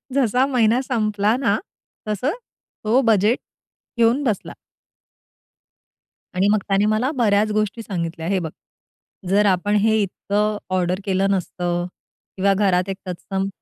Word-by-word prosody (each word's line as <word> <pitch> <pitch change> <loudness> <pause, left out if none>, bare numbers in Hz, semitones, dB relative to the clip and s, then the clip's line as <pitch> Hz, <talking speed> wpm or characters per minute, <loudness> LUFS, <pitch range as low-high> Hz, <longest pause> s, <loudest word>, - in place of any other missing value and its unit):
जसा 255 -1 +3
महिना 235 +1 +3
संपला 215 -4 0
ना, 215 -6 +2 0.5
तसं 215 +8 0 0.5
तो 230 +5 +3
बजेट 215 +4 +3 0.6
घेऊन 235 +5 +3
बसला. 220 -8 -2 1.8
आणि 185 +2 +2
मग 215 - +3
त्याने 195 +1 +2
मला 215 +6 +1
बऱ्याच 215 -3 +2
गोष्टी 215 +1 -1
सांगितल्या, 170 -5 -4
"हे 195 0 +1
बघ, 165 -3 -4 0.8
जर 205 +2 +4
आपण 200 +1 +2
हे 220 +1 +3
इतकं 205 +2 -1 0.2
ऑर्डर 180 +1 0
केलं 195 0 +1
नसतं 175 -2 -1 0.5
किंवा 195 +1 +3
घरात 190 -2 +1
एक 190 - -3
तत्सम 190 +2 -3
205 Hz, 130 wpm, -21 LUFS, 190-220 Hz, 1.8 s, जर